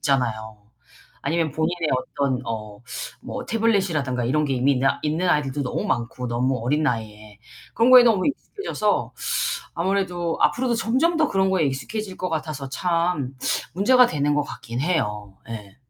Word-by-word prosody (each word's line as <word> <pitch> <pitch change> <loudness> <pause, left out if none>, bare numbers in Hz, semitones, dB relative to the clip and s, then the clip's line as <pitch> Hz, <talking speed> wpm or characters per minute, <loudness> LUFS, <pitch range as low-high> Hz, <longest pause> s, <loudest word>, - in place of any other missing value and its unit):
있잖아요. 110 -6 -1 0.6
아니면 165 -1 0
본인의 160 0 -1
어떤 130 0 -1
어 105 -2 -5 0.4
뭐 - - -6
태블릿이라든가 185 - +1
이런 150 +5 +1
게 140 - -1
이미 130 +3 +3
있느 130 0 0 0.2
있는 160 +4 0
아이들도 145 -3 +1
너무 125 - -2
많고 120 +1 -2
너무 125 +2 0
어린 150 +5 +1
나이에. 110 -4 -3 0.4
그런 235 +3 +4
거에 250 -1 +10
너무 215 -6 +3
익숙해져서 400 +8 -2 0.6
아무래도 175 -2 -1
앞으로도 245 -1 +2
점점 265 +10 +1
더 310 -1 +3
그런 190 0 +2
거에 185 -4 +2
익숙해질 190 +9 -4
것 185 - -2
같아서 150 -4 -3
참 165 -3 -1 0.4
문제가 250 +6 +5
되는 145 -3 0
것 150 - +2
같긴 125 -3 -6
해요. 105 - -1
예. 105 -3 -8
150 Hz, 345 characters per minute, -23 LUFS, 125-185 Hz, 0.6 s, 거에